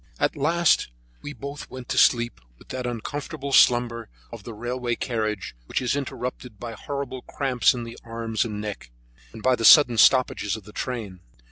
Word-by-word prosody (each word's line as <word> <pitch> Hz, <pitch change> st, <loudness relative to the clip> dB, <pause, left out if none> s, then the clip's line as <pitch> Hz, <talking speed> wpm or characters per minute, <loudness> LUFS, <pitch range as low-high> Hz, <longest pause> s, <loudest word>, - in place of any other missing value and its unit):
At -, -, +1 dB
last 165 Hz, -, +2 dB, 0.3 s
we 145 Hz, -, -6 dB
both 140 Hz, 0 st, -8 dB
went 130 Hz, -1 st, -9 dB
to -, -, -2 dB
sleep 120 Hz, -, +3 dB, 0.2 s
with -, -, -20 dB
that 130 Hz, -1 st, -4 dB
uncomfortable 140 Hz, +4 st, -5 dB
slumber 120 Hz, -3 st, +4 dB, 0.2 s
of 115 Hz, -2 st, -8 dB
the 115 Hz, +3 st, -9 dB
railway 120 Hz, +1 st, -2 dB
carriage, 110 Hz, -6 st, -3 dB
which -, -, -1 dB
is 125 Hz, +1 st, 0 dB
interrupted 125 Hz, -4 st, -5 dB
by 120 Hz, +1 st, -6 dB
horrible 135 Hz, +2 st, -5 dB
cramps 130 Hz, -2 st, +1 dB
in 120 Hz, -, -4 dB
the 115 Hz, 0 st, -9 dB
arms 115 Hz, -1 st, -2 dB
and 105 Hz, -3 st, -5 dB
neck, 105 Hz, -, -6 dB, 0.4 s
and 110 Hz, -1 st, -11 dB
by 130 Hz, 0 st, +4 dB
the 115 Hz, -, -5 dB
sudden 120 Hz, -2 st, +8 dB
stoppages 115 Hz, -4 st, +4 dB
of 110 Hz, -, -9 dB
the 105 Hz, +2 st, -14 dB
train. 110 Hz, -8 st, -5 dB
120 Hz, 175 wpm, -24 LUFS, 115-130 Hz, 0.4 s, sudden